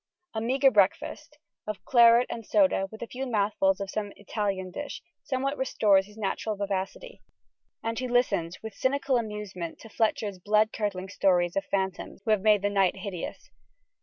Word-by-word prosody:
A 220 - -2
meagre 265 +4 +3
breakfast, 260 - +1 0.3
of 215 -1 -5
claret 235 -1 +6
and 230 - -5
soda 280 -6 +2
with 220 +1 -8
a - - -6
few 265 +3 -5
mouthfuls 200 -4 +1
of 195 -1 -4
some 205 -1 -3
Italian 200 -3 -3
dish, 290 +9 -6 0.2
somewhat 275 +2 -2
restores 205 -7 +3
his 210 +1 -16
natural 215 +1 -2
vivacity: 200 - -4 0.6
and 225 +1 -2
he 255 - -2
listens 240 -9 0
with 220 -2 -6
cynical 270 +3 0
amusement 210 -6 -5
to 225 - -11
Fletcher's 210 -3 -1
blood 215 +3 +2
curdling 195 -3 -3
stories 175 -3 +2
of 195 - 0
the - - -33
phantoms 190 0 -2
who 220 - +1
have 215 -3 +3
made 210 -1 +4
night 195 -3 +2
hideous. 190 -2 -7
210 Hz, 165 wpm, -27 LUFS, 195-235 Hz, 0.6 s, claret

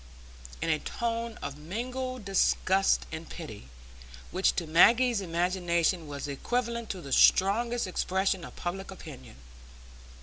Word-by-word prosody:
in 165 - -1
a 155 - +1
tone 230 +2 -3
of 140 +1 -5
mingled 250 +7 -4
disgust 195 0 +2
and 160 +1 -7
pity, 110 - -9 0.6
which 185 +2 +2
to 170 - -1
Maggie's 230 +8 +5
imagination 175 -1 0
was 145 0 -5
equivalent 235 - -2
to 185 - -4
the 140 -4 -5
strongest 235 +5 +4
expression 190 0 0
of - - -10
public 190 +2 -5
opinion. 160 - -10
190 Hz, 125 wpm, -29 LUFS, 165-230 Hz, 0.6 s, Maggie's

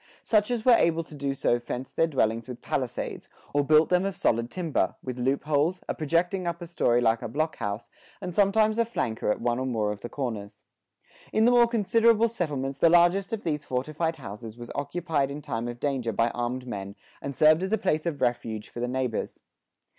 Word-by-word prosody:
Such 210 -1 +2
as 240 -3 -2
were 255 - +7
able 165 -6 +3
to 160 - -15
do 140 -1 -2
so 120 -2 +1
fenced 125 +2 -6
their 165 - +3
dwellings 115 -6 0
with 125 -1 -8
palisades, - - -3 0.2
or 145 0 +3
built 155 +2 +5
them 180 0 +3
of 195 -1 -2
solid 115 +1 +1
timber, 170 -2 -1
with 125 -1 -5
loopholes, 145 +6 +1
a - - -1
projecting 175 +4 0
upper 170 0 -3
story 120 -8 +2
like 115 -1 +2
a - - -4
block 155 +2 -2
house, 100 +2 -4 0.3
and 185 -3 -5
sometimes 215 +3 +3
a - - +5
flanker 115 - -2
at - - -1
one 120 +1 0
or 130 - -2
more 110 -4 0
of 105 -1 -7
the 120 - -6
corners. 115 -7 -5 0.7
In 220 - +3
the 245 - +6
more 240 -1 +6
considerable 230 +1 +3
settlements 140 - -3
the 165 - +6
largest 175 +3 +4
of 225 -2 -3
these 150 -3 -2
fortified 155 +6 -2
houses 110 -4 -9
was 120 -1 -8
occupied 145 -1 -1
in 140 +1 -5
time 120 -6 -4
of 120 0 -6
danger 130 -5 -1
by 115 +2 +1
armed 125 +1 -3
men 100 -4 -6 0.3
and 140 -1 -5
served 155 +4 +5
as 190 +1 -2
a 220 - +3
place 155 -6 0
of 145 -5 -3
refuge 120 -3 -1
for - - -8
the 120 - -1
neighbors. 125 -2 -2
145 Hz, 205 wpm, -27 LUFS, 120-175 Hz, 0.7 s, were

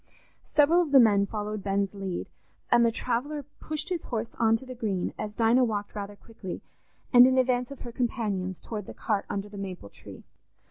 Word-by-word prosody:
Several 310 +4 +6
of 335 - -1
the 275 - +8
men 205 -4 +5
followed 210 -1 -4
Ben's 195 0 0
lead, 195 -3 -4 0.5
and 240 - +6
the 230 - +4
traveller 255 +6 -2 0.2
pushed 310 +2 -4
his 355 -3 -1
horse 230 -1 -4
on 225 -1 +4
to 260 - -12
the 255 - -7
Green, 210 -7 -2
as 210 - -3
Dinah 235 +3 +4
walked 205 -4 -2
rather 205 -1 -6
quickly 200 -3 -8 0.5
and 245 0 +10
in 260 0 +2
advance 250 -1 +2
of 280 - -10
her 240 - -7
companions 210 -7 -2
towards 210 -4 -6
the - - -9
cart 210 -3 -1
under 200 0 -3
the 205 -1 -9
maple 185 - -6
tree. - - -13
225 Hz, 195 wpm, -28 LUFS, 200-250 Hz, 0.5 s, and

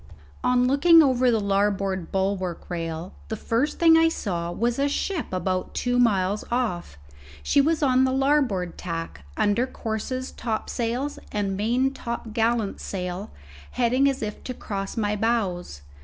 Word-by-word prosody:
On 250 0 +3
looking 320 +5 +6
over 255 -2 +3
the 225 -2 +2
larboard 195 -3 0
bulwark 190 -2 -2
rail, 165 +1 -4
the 220 - -3
first 230 +6 -1
thing 330 -1 +6
I 325 0 +5
saw 175 - -3
was 235 +7 -1
a 285 +1 +2
ship 335 +3 -2
about 185 0 -2
two 245 0 +1
miles 205 -3 +2
off. 180 - -2 0.5
She 285 - +4
was 315 +2 +1
on 260 -1 +4
the 260 - +2
larboard 265 - +1
tack, 165 - -5
under 210 +5 +2
courses, 255 +3 -4
topsails, 240 +4 -3
and 200 -2 -1
main 240 +6 +1
topgallant 230 -3 -1
sail, 180 +1 -4 0.5
heading 255 +3 +3
as 270 -4 -3
if 210 -1 -5
to 255 - -4
cross 195 -2 -5
my 210 -1 0
bows. 200 - -1
225 Hz, 145 wpm, -25 LUFS, 190-255 Hz, 0.5 s, looking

